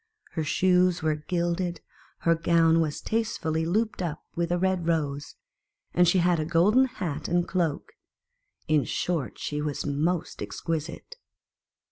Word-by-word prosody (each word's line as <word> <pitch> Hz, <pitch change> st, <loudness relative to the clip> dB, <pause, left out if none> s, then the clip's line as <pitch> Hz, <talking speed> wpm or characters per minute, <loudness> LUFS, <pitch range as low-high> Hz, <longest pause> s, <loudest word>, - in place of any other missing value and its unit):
Her 160 Hz, -, -2 dB
shoes 180 Hz, +2 st, +2 dB
were 155 Hz, -1 st, +2 dB
gilded, 170 Hz, +2 st, -2 dB, 0.4 s
her 165 Hz, -, +4 dB
gown 165 Hz, 0 st, +3 dB
was 155 Hz, -2 st, -2 dB
tastefully 165 Hz, -8 st, -1 dB
looped 215 Hz, +3 st, 0 dB
up 160 Hz, -4 st, -4 dB
with 170 Hz, 0 st, -1 dB
a 175 Hz, -, +2 dB
red 185 Hz, -2 st, 0 dB
rose, 145 Hz, -4 st, -1 dB, 0.6 s
and 180 Hz, 0 st, +4 dB
she 175 Hz, -, +4 dB
had 175 Hz, -1 st, +3 dB
a -, -, 0 dB
golden 180 Hz, +11 st, +4 dB
hat 170 Hz, -, -4 dB
and 175 Hz, 0 st, +1 dB
cloak; 175 Hz, -, -1 dB, 0.8 s
in 155 Hz, -2 st, +3 dB
short, 165 Hz, -8 st, -2 dB
she 150 Hz, 0 st, -3 dB
was 150 Hz, -1 st, -3 dB
most 155 Hz, +4 st, -1 dB
ex -, -, -5 dB
quisite. 165 Hz, -, -4 dB
170 Hz, 145 wpm, -27 LUFS, 155-180 Hz, 0.8 s, her